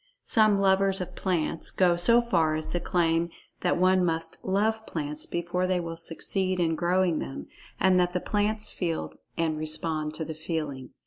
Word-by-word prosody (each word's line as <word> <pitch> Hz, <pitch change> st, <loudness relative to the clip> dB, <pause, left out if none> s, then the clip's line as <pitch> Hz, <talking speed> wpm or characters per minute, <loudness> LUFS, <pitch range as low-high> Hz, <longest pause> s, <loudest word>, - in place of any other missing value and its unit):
Some 215 Hz, -2 st, +4 dB
lovers 195 Hz, 0 st, +3 dB
of 180 Hz, 0 st, -6 dB
plants 170 Hz, -3 st, -1 dB
go 180 Hz, -2 st, +3 dB
so 230 Hz, +8 st, +6 dB
far 160 Hz, -10 st, +2 dB
as 155 Hz, 0 st, -2 dB
to 175 Hz, -, -1 dB
claim 170 Hz, -1 st, +1 dB, 0.3 s
that -, -, +1 dB
one 185 Hz, +1 st, +4 dB
must 165 Hz, -1 st, -2 dB
"love" 215 Hz, +3 st, 0 dB
plants 150 Hz, -1 st, -3 dB
before 175 Hz, +2 st, -1 dB
they 185 Hz, -1 st, +1 dB
will 165 Hz, -1 st, -5 dB
succeed 185 Hz, +3 st, -3 dB
in 165 Hz, -2 st, +2 dB
growing 175 Hz, 0 st, +1 dB
them, 135 Hz, -, -6 dB, 0.3 s
and 185 Hz, -1 st, +4 dB
that 180 Hz, 0 st, +1 dB
the 180 Hz, -, 0 dB
plants 210 Hz, +2 st, -1 dB
feel 170 Hz, -3 st, -3 dB, 0.2 s
and 160 Hz, -2 st, 0 dB
respond 155 Hz, 0 st, -2 dB
to 160 Hz, -, -3 dB
the 160 Hz, -, -5 dB
feeling. 155 Hz, -5 st, -4 dB
175 Hz, 175 wpm, -27 LUFS, 160-190 Hz, 0.3 s, so